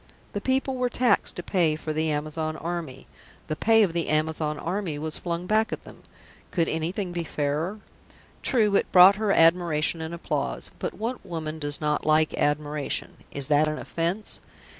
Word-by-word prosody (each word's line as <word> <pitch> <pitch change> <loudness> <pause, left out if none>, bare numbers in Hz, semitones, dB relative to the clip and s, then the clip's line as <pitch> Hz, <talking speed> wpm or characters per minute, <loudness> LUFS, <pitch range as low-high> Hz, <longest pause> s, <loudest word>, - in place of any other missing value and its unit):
The 205 - -3
people 265 +2 0
were 250 -1 +1
taxed 245 0 +2
to - - -5
pay 170 -5 +2
for 155 0 -4
the 155 +1 0
Amazon 155 +1 -2
Army; 165 -5 -5 0.4
the 155 - -3
pay 225 +7 +4
of 180 -5 0
the 170 -1 -1
Amazon 155 0 0
Army 175 -2 -3
was 155 +1 -2
flung 170 0 -3
back 215 +3 +2
at - - -5
them; - - -14 0.5
could 165 -3 +1
anything 175 +4 -2
be 175 -1 -2
fairer? 155 +7 -2 0.6
True, 215 -6 +2
it - - -1
brought 185 +2 +8
her 215 -2 +1
admiration 165 -2 +3
and 160 0 -5
applause. 170 0 -3
But - - -3
what 235 +4 -4
woman 160 -3 -5
does 145 -1 -1
not 150 -1 0
like 155 0 +3
admiration? 145 0 -1
Is 140 -2 -1
that 150 +1 +4
an 155 0 -2
offence? 170 +8 -2
165 Hz, 175 wpm, -26 LUFS, 155-195 Hz, 0.6 s, brought